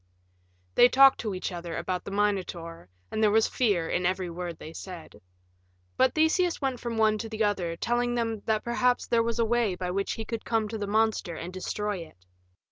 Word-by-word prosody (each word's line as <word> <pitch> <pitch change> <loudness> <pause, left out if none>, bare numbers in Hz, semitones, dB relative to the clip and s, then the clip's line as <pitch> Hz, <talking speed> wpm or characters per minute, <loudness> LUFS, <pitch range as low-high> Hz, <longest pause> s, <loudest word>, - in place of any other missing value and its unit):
They 245 - +7
talked 270 +1 +6
to 215 -4 -3
each 185 - -3
other 170 -2 -5
about 180 -1 -3
the - - -5
Minotaur, 185 - -2 0.2
and 220 - -2
there 215 - +5
was 220 +1 +4
fear 200 -10 +1
in 180 - -1
every 185 0 -1
word 175 0 -5
they 160 - -10
said. 180 -3 -9 0.7
But 260 -1 +3
Theseus 325 +3 +2
went 265 -3 -2
from 235 -1 -4
one 215 -1 +3
to 225 - -5
the 220 0 -1
other, 185 -5 0
telling 240 +5 0
them 225 -3 -1
that 215 -1 +1
perhaps 245 +1 +1
there 230 -1 +2
was 230 0 -1
a 230 - +2
way 230 -4 +1
by 180 0 -3
which 195 +2 -1
he 225 - -5
could 230 -1 -4
come 225 -2 0
to 220 0 -5
the 205 - -3
monster 215 -4 +1
and 175 +3 -7
destroy 210 +2 -3
it. 165 - -11
215 Hz, 210 wpm, -27 LUFS, 180-235 Hz, 0.7 s, They